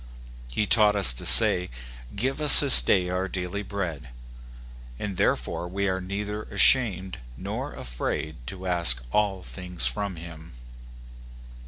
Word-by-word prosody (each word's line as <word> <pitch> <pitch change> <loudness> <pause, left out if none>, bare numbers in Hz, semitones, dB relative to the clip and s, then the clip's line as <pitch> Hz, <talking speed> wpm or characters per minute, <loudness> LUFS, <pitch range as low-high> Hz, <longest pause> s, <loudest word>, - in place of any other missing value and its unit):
He 105 - -4
taught 105 -1 +1
us 95 -11 +5
to - - -6
say, 90 0 +6 0.5
"Give 130 +7 -5
us 150 -1 +10
this 140 -3 +8
day 90 -2 -2
our 90 +1 -5
daily 90 +2 -7
bread," 90 -11 -8 0.9
and 100 +4 -8
therefore 90 - -4
we 100 +2 -5
are 95 0 -5
neither 105 +3 -8
ashamed 105 -6 -1 0.2
nor - - -9
afraid 65 +4 -8
to 90 +9 -10
ask 85 -10 -1
all 100 -1 -3
things 90 -7 -7
from 95 +11 -5
him. 80 -3 -14
95 Hz, 135 wpm, -22 LUFS, 85-100 Hz, 0.9 s, us